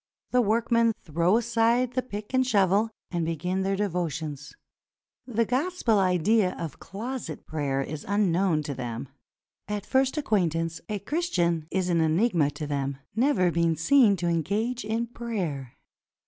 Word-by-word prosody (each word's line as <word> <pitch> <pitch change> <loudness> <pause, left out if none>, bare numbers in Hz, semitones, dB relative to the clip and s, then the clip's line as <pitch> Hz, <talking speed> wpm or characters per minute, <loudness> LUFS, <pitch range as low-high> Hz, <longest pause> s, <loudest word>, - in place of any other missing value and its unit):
The 250 - +4
work 225 +2 0
men 230 -1 +4
throw 170 +6 +2
aside 235 +1 +2
the 255 - +1
pick 210 -2 -8
and 260 0 +4
shovel 205 -2 +3 0.2
and 175 -2 -1
begin 180 +4 -1
their 195 +1 0
459 185 -3 0 0.3
PERSIA 145 +1 -11
devotions. - - -14 0.7
The 230 -2 +1
Gospel 255 - +1
idea 185 +2 +2
of 160 -5 -6
closet 215 - -6
prayer 140 -3 -1
is 150 +1 -6
unknown 190 -5 +2
to 145 - -4
them. 120 -1 -5 0.6
At 210 0 -3
first 265 +2 +1
acquaintance 165 - 0
a 210 - -1
Christian 180 - 0
is 185 -1 -1
an 170 -2 +2
enigma 160 -1 +2
to 145 +1 -6
them, 140 -2 -2 0.2
never 225 -8 +3
being 170 -1 +2
seen 210 - +5
to 175 -2 -2
engage 205 +9 -1
in 225 +2 -1
prayer. 190 - -4
195 Hz, 155 wpm, -27 LUFS, 165-230 Hz, 0.7 s, seen